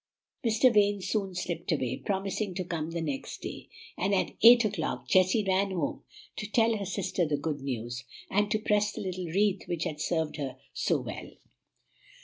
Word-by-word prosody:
Mr. 230 +2 +4
Vane 205 -1 +4
soon 195 0 -2
slipped 175 -1 -3
away, 130 -5 0
promising 195 +1 -2
to 185 - -1
come 165 -3 -3
the 165 0 -3
next 140 -4 -4
day; - - -7 0.3
and 195 +3 +1
at 185 - +1
eight 235 +1 +9
o'clock 195 -6 -2
Jessie 185 +4 +4
ran 195 +1 +2
home 175 -6 -2 0.4
to 210 - -4
tell 225 +1 +3
her 200 - -4
sister 185 -1 -1
the 150 -1 0
good 145 -1 -3
news, 120 -2 -4 0.2
and 205 +1 +1
to 215 - +2
press 210 -1 +1
the - - -5
little 185 -2 -4
wreath 195 +3 +1
which 170 -2 -2
had 155 -4 -4
served 160 -2 -1
her 135 -3 -4 0.2
so - - +1
well. - - -7
185 Hz, 180 wpm, -29 LUFS, 160-205 Hz, 0.4 s, eight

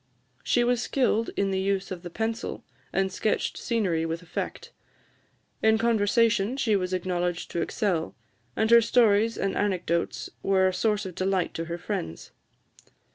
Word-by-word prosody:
She 240 - +2
was 245 0 +1
skilled 235 -5 +1
in 195 -1 +1
the 190 - 0
use 195 0 -1
of 180 -2 -5
the 175 - -7
pencil, 225 +5 -3 0.3
and 190 0 0
sketched 215 - -1
scenery 190 -9 0
with 165 +1 -3
effect. 175 - -5 0.9
In 220 0 +4
conversation 230 +1 +2
she 225 -6 +2
was 185 -2 -1
acknowledged 180 -1 -2
to 170 - -1
excel; 175 -3 -1 0.4
and 220 +1 +1
her 235 0 +9
stories 225 -1 +3
and 195 - -1
anecdotes 180 -4 -1
were 190 -1 +3
a 185 - 0
source 210 +2 0
of 185 - -6
delight 185 0 0
to 165 - -4
her 170 +1 -4
friends. 80 - -5
195 Hz, 155 wpm, -27 LUFS, 180-220 Hz, 0.9 s, her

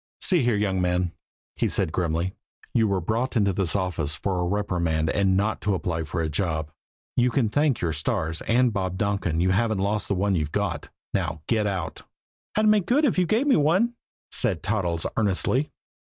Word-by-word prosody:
"See 180 -5 +4
here, 120 -3 +2
young 100 -3 0
man," 90 -1 +1 0.4
he - - 0
said - - 0
grimly, 85 +1 -1 0.4
"you 115 -2 +3
were 100 -2 +1
brought 115 +8 -1
into 100 -3 +2
this 90 -1 0
office 85 -7 -1
for 95 -2 -2
a 90 - 0
reprimand 85 -5 0
and 95 -2 +2
not 105 +2 0
to 100 -1 +1
apply 80 -3 -2
for 85 +3 -3
a 80 - 0
job! 80 -2 -2 0.4
You 125 0 +3
can 120 -3 +1
thank 145 0 +1
your 80 -2 0
stars 80 +1 -1
and 120 0 +3
Bob 95 -2 -2
Donkin 95 -5 0
you 95 +1 +3
haven't 110 +2 +1
lost 100 +2 -1
the 100 - 0
one 100 +2 +1
you've 75 -4 -1
got. - - -2 0.2
Now, 80 -2 -2
get 110 -3 +1
out!" 95 -3 -3 0.6
"I'd 215 - +3
make 210 -3 +4
good 290 +5 +3
if 225 -8 +2
you 180 - +2
gave 225 +9 +2
me 285 - +4
one," 180 +11 +3 0.4
said 95 -11 0
Toddles 90 -5 -1
earnestly. 110 +7 +1
100 Hz, 195 wpm, -25 LUFS, 85-115 Hz, 0.6 s, See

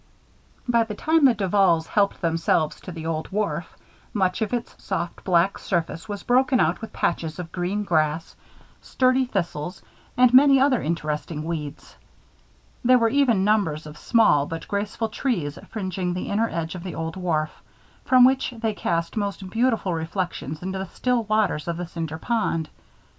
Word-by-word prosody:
By 235 -1 +3
the 220 -2 -6
time 315 +5 +3
the 250 -3 +5
Duvals 190 -4 +2
helped 200 +1 +1
themselves 165 -2 0
to 185 - -8
the 160 -2 -7
old 160 -1 -3
wharf, 210 +1 -2 0.4
much 190 +1 +1
of 220 - -1
its 240 -2 -3
soft 170 +1 -3
black 180 +1 +2
surface 170 0 -2
was 205 -1 -5
broken 255 +1 +3
out 165 +6 +1
with 225 - -7
patches 165 -2 -2
of 175 -2 -7
green 185 +4 -2
grass, 160 -3 0 0.5
sturdy 255 0 +2
thistles, 175 -6 -3 0.3
and 250 -1 +5
many 275 +1 +7
other 265 -2 +3
interesting 155 -1 -3
weeds. 155 -3 -6 0.9
There 255 +1 +6
were 230 -2 +3
even 235 -7 +3
numbers 195 -8 +1
of 150 0 -9
small 150 - +3
but 165 0 -6
graceful 205 +2 -2
trees 175 - -2
fringing 185 -4 -3
the 180 - -4
inner 225 +3 +1
edge 165 -1 -3
of 180 - -7
the 180 -1 -6
old 165 0 -4
wharf, 160 -5 -1 0.5
from 255 -1 +6
which 260 -1 +2
they 225 -1 -1
cast 170 -4 -2
most 200 -3 -3
beautiful 225 -5 +1
reflections 165 -2 -4
into 190 +1 -3
the 190 - -4
still 245 +3 -1
waters 210 -8 0
of 170 -1 -2
the 175 - -3
Cinder 165 -2 -5
Pond. 165 -6 -1
190 Hz, 165 wpm, -24 LUFS, 165-225 Hz, 0.9 s, many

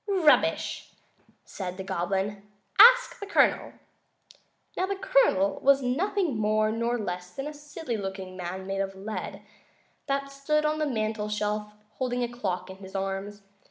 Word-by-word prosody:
"Rubbish!" 370 -7 +2 0.5
said 185 -2 -6
the 190 - -5
Goblin. 195 +2 -2 0.4
"Ask - - +8
the 405 - -6
Colonel." - - +2 1.0
Now, 370 - 0
the 395 - -1
Colonel 385 - +2
was 275 0 +4
nothing 325 - 0
more 215 0 +2
nor 235 +2 0
less 180 -4 -4
than 270 - -4
a 300 - -5
silly 295 -4 -5
looking 190 -2 -6
little 175 -1 -4
man, 190 +1 -7
made 195 0 -2
of 195 0 -3
lead, 205 +3 -6 0.6
that 275 0 -1
stood 300 +2 0
on 305 0 +1
the 305 - +1
mantel 215 -4 -2
shelf 210 0 -2 0.3
holding 250 -1 0
a - - 0
clock 190 -7 -4
in 190 - -11
his 190 0 -11
arms. 195 +1 -4
215 Hz, 160 wpm, -27 LUFS, 195-285 Hz, 1.0 s, Ask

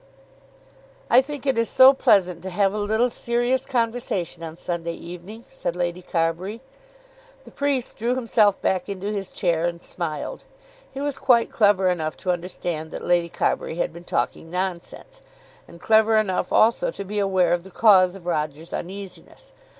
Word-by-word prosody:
"I 250 - +8
think 285 0 -7
it 265 -4 +1
is 230 - +1
so 260 +1 +8
pleasant 195 -10 +2
to 190 - -6
have 195 +1 +1
a 210 - -3
little 220 +4 +1
serious 240 +3 -1
conversation 230 -9 -2
on 165 0 -7
Sunday 170 -1 -4
evening," 180 +7 -10
said 175 -9 -4
Lady 175 0 -2
Carbury. 175 +5 -2 0.8
The - - -15
priest 280 -3 -1
drew 240 +3 0
himself 225 -5 +2
back 185 0 0
into 200 +1 -4
his 200 -2 -4
chair 170 -2 0
and 170 0 -3
smiled. 170 - -5 0.5
He 270 - -7
was 285 -1 -3
quite 235 -3 +3
clever 205 -3 +3
enough 160 -4 -1
to 185 - -1
understand 175 -2 -4
that - - -7
Lady 175 -1 +2
Carbury 160 - -1
had 175 -1 -2
been 170 +1 -11
talking 165 - -2
nonsense, 180 0 -5 0.5
and 170 - -14
clever 220 +2 +4
enough 200 -4 0
also 235 - +3
to 350 - -6
be 210 +2 -3
aware 185 -3 +2
of 175 -1 -1
the 190 - -12
cause 190 -2 +5
of 190 -3 -12
Roger's 155 -1 -3
uneasiness. 200 - -8
190 Hz, 165 wpm, -23 LUFS, 175-230 Hz, 0.8 s, I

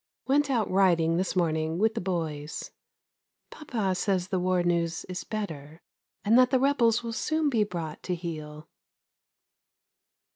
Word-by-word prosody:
Went 285 +2 +2
out 235 -5 +1
riding 170 -4 +3
this 185 +2 -1
morning 160 -2 0
with 220 +3 +2
the - - -3
boys. 160 -5 -4 0.8
Papa 225 -10 -2
says 185 0 0
the 190 -2 0
war 180 0 +1
news 170 -1 0
is 185 0 -5
better, 160 -8 -6 0.4
and 225 +4 +6
that 255 -1 +5
the 265 - +3
rebels 245 -4 +3
will 230 -1 -4
soon 310 +4 0
be 225 -4 +3
brought 170 -6 -5
to 180 - -2
heel. 155 -3 -7
185 Hz, 145 wpm, -27 LUFS, 165-225 Hz, 0.8 s, and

